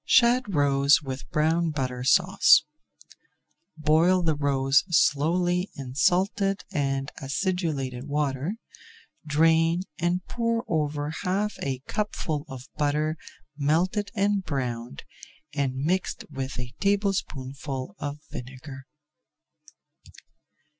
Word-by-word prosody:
SHAD 240 -2 +4
ROES 140 +1 +4
WITH 130 -1 -6
BROWN 160 +2 +1
BUTTER 130 -4 -3
SAUCE 130 - +5 1.1
Boil 160 +4 +3
the 160 -2 +2
roes 140 -2 +2
slowly 175 +4 +2
in 130 -2 -7
salted 195 - +1
and 135 -2 -1
acidulated 140 -4 -2
water, 145 +4 -1 0.7
drain, 165 +3 +3 0.2
and 175 +2 0
pour 230 0 -1
over 150 -2 -1
half 200 +3 0
a 130 -2 -3
cupful 165 -8 -2
of 130 0 -9
butter 150 +1 +1 0.4
melted 175 +8 +1
and 200 0 +1
browned, 120 - -4 0.5
and 140 -3 -1
mixed 170 +8 -1
with 135 -1 -5
a 120 0 -6
tablespoonful 140 - -2
of 145 0 -4
vinegar. 130 +2 -9
150 Hz, 100 wpm, -26 LUFS, 135-180 Hz, 1.1 s, SAUCE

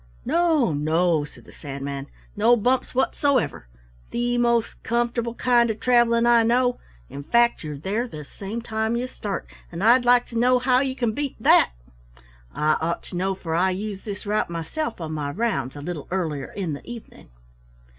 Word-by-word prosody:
"No, 315 - +2
no," 155 +1 +1
said - - -16
the - - -15
Sandman. 140 -1 -6 0.3
"No 225 +4 +5
bumps 250 +3 0
whatsoever, 260 - +1 0.4
the 240 0 -1
most 235 -1 +1
comfortable 235 0 -1
kind 240 -2 +3
of 220 -1 -3
traveling 235 -1 +3
I 235 -1 +6
know, 245 +2 +2 0.3
in 140 - -8
fact 235 +9 +2
you're 150 -2 -5
there 205 - -2
the 150 -9 -9
same 205 +9 -6
time 220 0 -1
you 240 +1 -1
start, 210 -6 -5 0.3
and 170 +2 -5
I'd 240 +3 +6
like 245 0 +4
to 235 - -10
know 250 +1 +4
how 250 0 +3
you 265 -1 -1
can 240 -4 0
beat 280 +4 -3
that? 140 - +5 0.8
I 155 - +1
ought 170 +1 -2
to - - -10
know, 190 +2 0
for 165 -3 -5
I 180 +3 +3
use 195 +1 -4
this 205 -1 -6
route 210 -2 0
myself 205 - -4
on 160 -2 -5
my 150 -2 -3
rounds 145 - -2
a 145 - -7
little 165 -3 -5
earlier 160 -7 -3
in 185 -6 -3
the 140 - -7
evening." 235 -2 -11
220 Hz, 180 wpm, -24 LUFS, 165-240 Hz, 0.8 s, I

